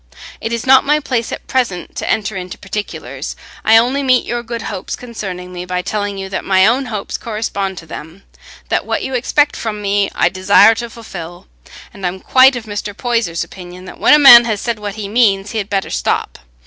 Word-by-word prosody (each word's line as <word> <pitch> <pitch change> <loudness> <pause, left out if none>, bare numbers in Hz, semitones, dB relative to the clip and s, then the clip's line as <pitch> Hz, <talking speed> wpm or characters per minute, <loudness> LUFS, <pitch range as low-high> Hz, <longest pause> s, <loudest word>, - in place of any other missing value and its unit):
It 225 - -3
is 235 -1 -3
not 265 0 +6
my 300 +2 +2
place 250 -5 -2
at - - -6
present 230 -9 -2
to - - -3
enter 215 -1 -1
into 180 -1 -6
particulars; 205 +1 -6 0.3
I 220 +1 +6
only 250 +5 +2
meet 255 -2 +2
your 240 0 -3
good 235 -1 -6
hopes 190 -2 -5
concerning 190 -7 -7
me 175 0 -5
by 180 0 -3
telling 205 -1 -3
you 195 0 -5
that 190 - -4
my 190 -1 +4
own 250 +5 +2
hopes 210 -4 -4
correspond 200 -4 -3
to 165 - -9
them—that 160 +4 -7
what - - -1
you 265 - -4
expect 290 +4 +1
from 215 -2 -4
me 200 -1 0
I - - +3
desire 190 +4 +5
to 235 +1 -5
fulfil; 175 -7 -9 0.5
and 195 - -13
I - - +1
am 185 +2 -5
quite 260 +5 +5
of 240 -2 -6
Mr. 205 -1 -5
Poyser's 230 -9 -1
opinion, 180 0 -11
that - - -11
when - - +6
a - - +6
man 240 -5 +9
has 220 -3 -1
said 235 -1 -3
what 205 -1 -5
he 210 -2 -5
means, 205 -3 +2
he 225 - -2
had 200 0 -4
better 195 -2 -2
stop. - - -2
210 Hz, 210 wpm, -16 LUFS, 190-235 Hz, 0.5 s, man